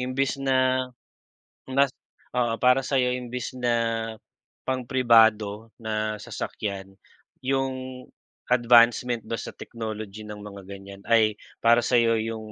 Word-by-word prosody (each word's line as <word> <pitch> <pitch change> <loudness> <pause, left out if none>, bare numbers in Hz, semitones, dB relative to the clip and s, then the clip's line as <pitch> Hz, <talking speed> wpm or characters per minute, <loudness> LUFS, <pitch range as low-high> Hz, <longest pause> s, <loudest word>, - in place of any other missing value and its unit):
imbes 130 +2 -1
na 130 -1 +2 0.8
nas 135 +1 +2 0.4
oo, 120 -2 +1
para 125 +1 +6
sa'yo 130 -2 +1
imbis 125 0 -4
na 120 -1 +1 0.9
pang 130 -2 -2
pribado 110 -4 +4
na 110 -1 -2
sasakyan, 100 -2 -6 0.5
'yung 130 -1 -2 0.4
advancement 120 0 +4
ba 115 - -2
sa - - -6
technology 110 -2 -7
ng 105 0 -8
mga 100 -1 -9
ganiyan 100 0 -10
ay 110 -2 +4 0.3
para 115 +1 +6
sa'yo 115 -2 +3
yung 110 -1 -5
120 Hz, 115 wpm, -25 LUFS, 110-130 Hz, 0.9 s, para